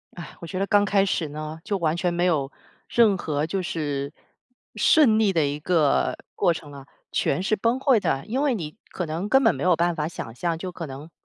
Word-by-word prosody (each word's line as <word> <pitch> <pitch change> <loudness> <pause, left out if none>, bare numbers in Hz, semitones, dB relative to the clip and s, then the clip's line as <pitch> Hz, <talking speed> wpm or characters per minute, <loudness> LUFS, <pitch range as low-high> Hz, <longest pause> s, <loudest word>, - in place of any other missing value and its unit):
唉， 170 -4 -9
我 170 - -7
觉 185 +1 -4
得 195 - 0
刚 205 -1 +4
开 200 0 +3
始 170 -4 -1
呢， 155 +2 -6
就 200 - -1
完 165 -2 0
全 175 0 0
没 175 +1 +1
有 145 -5 +1 0.4
任 220 -5 +4
何 150 -2 -2
就 190 +2 -2
是 145 -3 -3 0.6
顺 255 -9 +5
利 210 -3 +3
的 160 -3 +2
一 145 +1 -3
个 155 -3 +2 0.2
过 170 - +3
程 150 -2 -9
了， 140 -1 -11 0.3
全 140 - 0
是 215 +3 +1
崩 235 +5 0
溃 265 -5 +4
的。 135 -7 -1
因 260 +5 -1
为 280 -4 +2
你 165 -5 -5 0.2
可 180 - -3
能 165 +6 -3
根 270 +4 +4
本 225 - +4
没 - - -5
有 180 -2 +4
办 170 +1 +1
法 150 -1 -2
想 115 -8 -7
象， 170 +4 -1
就 185 +1 -5
可 170 -1 -6
能， 140 +3 -9
170 Hz, 245 characters per minute, -24 LUFS, 155-200 Hz, 0.6 s, 顺